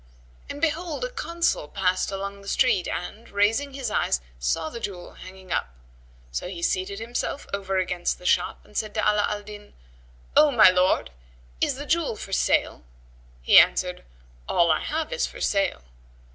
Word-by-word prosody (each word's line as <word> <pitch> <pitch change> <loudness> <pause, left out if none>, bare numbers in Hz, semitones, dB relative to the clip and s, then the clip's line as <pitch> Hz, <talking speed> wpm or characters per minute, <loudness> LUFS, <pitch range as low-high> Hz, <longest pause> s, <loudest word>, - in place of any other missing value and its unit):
And 285 - -6
behold, 330 +5 -1
a - - -4
Consul[FN#116] 340 - -1
passed 185 -1 +1
along 200 +1 -5
the 200 - -14
street; 225 -6 +2
and, 210 +6 -5
raising 225 +8 +1
his 260 -6 -3
eyes, 65 - +1 0.2
saw 155 - 0
the 235 - -6
jewel 185 -5 -6
hanging 185 -1 -12
up; 60 - -2 0.6
so - - -3
he 175 -2 -7
seated 185 +3 0
himself 240 +5 -3
over 195 -1 -1
against 180 -1 -1
the 180 - -15
shop 180 0 +1
and 210 - -20
said 215 -1 -2
to - - 0
Ala 210 0 +3
al 210 0 -3
Din, 205 0 -11 0.6
"O 300 0 +7
my 225 -8 +7
lord, 185 - +2 0.5
is - - +2
the 285 +2 -6
jewel 320 -6 0
for 195 - -8
sale?" - - +1 0.6
He - - +9
answered, - - +2 0.5
"All 170 -1 +4
I - - +2
have 320 +8 -3
is - - 0
for - - -11
sale." 195 - 0
200 Hz, 175 wpm, -25 LUFS, 185-260 Hz, 0.6 s, He